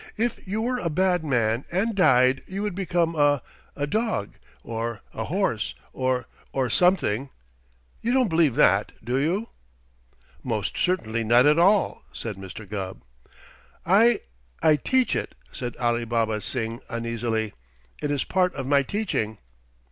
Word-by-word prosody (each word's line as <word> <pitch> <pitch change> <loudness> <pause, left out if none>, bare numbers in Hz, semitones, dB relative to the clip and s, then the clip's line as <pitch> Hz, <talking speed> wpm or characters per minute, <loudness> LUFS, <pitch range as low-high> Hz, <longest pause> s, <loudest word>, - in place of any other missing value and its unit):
If 235 +1 0
you 215 +4 -1
were 250 +1 0
a 170 - -1
bad 180 +1 +1
man 120 -4 +1
and 200 +6 +1
died 130 -8 +4
you 195 +2 -4
would 210 -3 -2
become 175 -3 0
a 145 -3 +3 0.3
a 145 - -1
dog, 215 - -1 0.3
or 115 -1 -4
a - - -3
horse, - - -1 0.2
or 130 -2 0 0.3
or 130 -3 0
something. 140 - +2 0.7
You 235 - 0
don't 255 -2 +3
believe 160 - +3
that, 100 -7 +3
do 125 +2 0
you?" 175 +11 0 0.9
"Most 110 -4 -2
certainly 115 -12 0
not 120 +3 +5
at 150 +2 +5
all!" 195 +3 +3
said 115 -3 -5
Mr. 95 +2 -9
Gubb. 95 -2 -5 0.8
"I 215 +7 +5 0.4
I 155 -1 +6
teach 255 - +1
it," - - -3 0.2
said 120 -2 -5
Alibaba 115 -2 0
Singh 115 0 -3
uneasily. 115 -2 -2 0.5
"It 145 - -1
is 145 -2 0
part 180 -1 +1
of 135 - -4
my 140 +1 +4
teaching." 135 - -2
135 Hz, 145 wpm, -25 LUFS, 115-185 Hz, 0.9 s, I